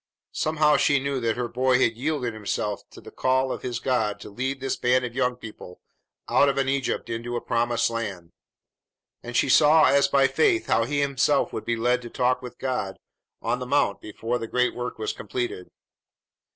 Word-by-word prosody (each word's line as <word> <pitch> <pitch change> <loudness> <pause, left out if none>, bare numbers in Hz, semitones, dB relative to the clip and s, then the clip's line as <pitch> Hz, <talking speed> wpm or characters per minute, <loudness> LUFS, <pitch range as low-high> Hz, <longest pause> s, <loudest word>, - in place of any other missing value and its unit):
Somehow 155 -1 +2
she 140 0 +3
knew 140 0 -2
that 115 -2 0
her 125 -1 -1
boy 125 +2 +2
had 115 -3 +2
yielded 130 -2 -2
himself 105 -1 -3
to - - -14
the - - -12
call 130 0 +1
of - - -4
his 125 -2 -3
God 110 -5 0
to - - -9
lead 130 +5 -3
this 135 0 -2
band 125 +1 +2
of 120 - -6
young 125 -1 0
people 110 -6 -11 0.5
out 140 - +4
of 140 - -1
an 135 -1 +1
Egypt 135 -1 -1
into 115 +1 -4
a - - 0
promised 120 0 0
land, 100 -7 -5 0.9
and 120 0 -4
she - - +3
saw 150 +4 +6
as 140 +1 +4
by 140 -1 +4
faith 355 - +2
how 115 - +2
he 145 +3 -1
himself 140 +1 +1
would - - -5
be 120 - 0
led 125 +2 +1
to 120 - -8
talk 125 +1 0
with 125 -1 -9
God 125 -7 -3 0.5
on 125 - 0
the 125 - -5
mount 145 +3 +1
before 115 +3 -3
the 115 - -5
great 125 +1 +1
work 125 0 -5
was 110 -1 -3
completed. 105 -3 -5
125 Hz, 200 wpm, -25 LUFS, 115-135 Hz, 0.9 s, saw